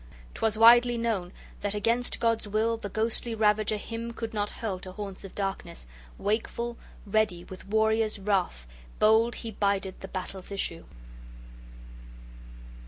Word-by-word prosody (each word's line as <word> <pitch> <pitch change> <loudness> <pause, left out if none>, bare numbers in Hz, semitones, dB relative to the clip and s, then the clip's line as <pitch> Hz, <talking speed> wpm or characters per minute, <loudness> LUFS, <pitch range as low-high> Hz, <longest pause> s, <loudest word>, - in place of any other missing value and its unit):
'Twas 220 -1 +1
widely 240 +1 +7
known 220 -6 -1 0.3
that 205 0 -2
against 230 +4 0
God's 230 -2 +1
will 220 +2 +1
the 215 -3 -6
ghostly 225 +2 +1
ravager 215 0 +2
him 230 +2 -5
{10a} - - -13
could 225 0 -5
not 205 -1 -1
hurl 200 -5 -4
to 185 0 -8
haunts 200 -1 -7
of 195 - -10
darkness; 195 - -4 0.3
wakeful, 235 +3 -2 0.3
ready, 205 -4 +1
with 185 +1 -11
warrior's 220 +1 +2
wrath, 190 - -1 0.3
bold 220 +2 +4
he 230 - -6
bided 200 -2 -1
the 195 - -6
battle's 190 0 -6
issue. 170 -4 -2
215 Hz, 140 wpm, -28 LUFS, 195-225 Hz, 0.3 s, widely